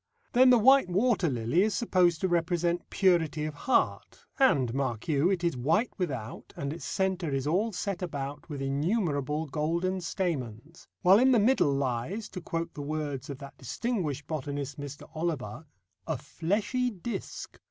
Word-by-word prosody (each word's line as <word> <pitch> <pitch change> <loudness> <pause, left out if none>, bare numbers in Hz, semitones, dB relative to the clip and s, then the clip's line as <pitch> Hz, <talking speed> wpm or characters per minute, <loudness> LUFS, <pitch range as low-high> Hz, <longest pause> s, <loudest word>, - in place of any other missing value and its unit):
Then 255 +1 +7
the 250 - +7
white 265 -1 +6
water 195 -1 +2
lily 120 +6 +1
is 210 0 +1
supposed 180 -8 +2
to 190 - +2
represent 175 0 0
purity 160 -5 +2
of 155 - -4
heart, 200 - 0
and, 135 - +3
mark 130 -5 -2
you, 150 +3 +3
it 185 -3 0
is 170 -4 +1
white 160 - +1
without 130 -11 -4
and 140 +1 -3
its 170 - -8
centre 190 -3 -1
is 135 -1 -1
all 190 +9 +1
set 195 -1 -3
about 145 -3 -5
with 140 -3 -4
innumerable 150 - 0
golden 170 +6 -1
stamens, 160 - -4 0.2
while 190 +3 +7
in 260 +2 +5
the 235 - +5
middle 215 - +3
lies, 140 - -2
to 185 - -7
quote 165 0 -3
the 145 - -6
words 145 -2 -4
of 140 - -5
that 140 0 -11
distinguished 150 - -2
botanist, 145 -2 -4
Mr. 145 0 -8
Oliver, 155 -4 -3 0.4
"a 160 -3 -1
fleshy 205 - -1
disc." 220 +2 -6
165 Hz, 165 wpm, -29 LUFS, 140-190 Hz, 0.4 s, Then